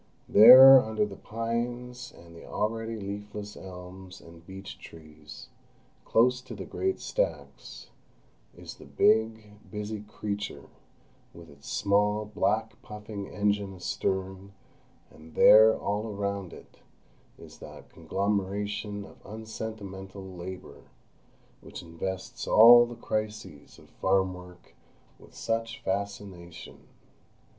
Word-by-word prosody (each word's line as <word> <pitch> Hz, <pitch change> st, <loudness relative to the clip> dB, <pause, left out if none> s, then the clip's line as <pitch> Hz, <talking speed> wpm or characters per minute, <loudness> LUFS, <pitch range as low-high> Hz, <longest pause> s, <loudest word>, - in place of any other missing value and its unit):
There, 130 Hz, +5 st, +10 dB
under 110 Hz, -2 st, -1 dB
the 100 Hz, -2 st, -9 dB
pines 120 Hz, +3 st, -5 dB
and 85 Hz, 0 st, -16 dB
the 85 Hz, -, -12 dB
already 115 Hz, +2 st, -3 dB
leafless 105 Hz, +1 st, -7 dB
elms 95 Hz, 0 st, -11 dB
and 85 Hz, 0 st, -16 dB
beech 95 Hz, +2 st, -10 dB
trees, 75 Hz, -2 st, -13 dB, 0.6 s
close 125 Hz, +2 st, +2 dB
to 130 Hz, -, -10 dB
the -, -, -7 dB
great 380 Hz, 0 st, -2 dB
stacks, -, -, -5 dB, 0.7 s
is -, -, -10 dB
the -, -, -14 dB
big, 110 Hz, -, +1 dB
busy 105 Hz, +1 st, -5 dB
creature, 105 Hz, -7 st, -6 dB, 0.7 s
with 85 Hz, -2 st, -13 dB
its 70 Hz, 0 st, -13 dB
small 105 Hz, +1 st, +1 dB
black 110 Hz, +1 st, -2 dB
puffing 105 Hz, -1 st, -8 dB
engine 100 Hz, -1 st, -1 dB
astern; 95 Hz, +1 st, -4 dB, 0.6 s
and 80 Hz, 0 st, -16 dB
there, 110 Hz, +1 st, +7 dB
all 105 Hz, +2 st, -3 dB
around 100 Hz, -3 st, -4 dB
it, -, -, -15 dB, 0.6 s
is -, -, -14 dB
that -, -, -13 dB
conglomeration 100 Hz, +3 st, -3 dB
of -, -, -17 dB
unsentimental 105 Hz, -3 st, -8 dB
labour 90 Hz, 0 st, -10 dB, 0.8 s
which -, -, -10 dB
invests 90 Hz, +3 st, -6 dB
all 120 Hz, +2 st, +8 dB
the 120 Hz, -, -9 dB
crises 110 Hz, -9 st, -5 dB
of -, -, -18 dB
farm 95 Hz, -1 st, 0 dB
work 90 Hz, 0 st, -14 dB, 0.5 s
with -, -, -18 dB
such 115 Hz, 0 st, -3 dB
fascination. 95 Hz, -3 st, -6 dB
100 Hz, 110 wpm, -27 LUFS, 95-110 Hz, 0.8 s, There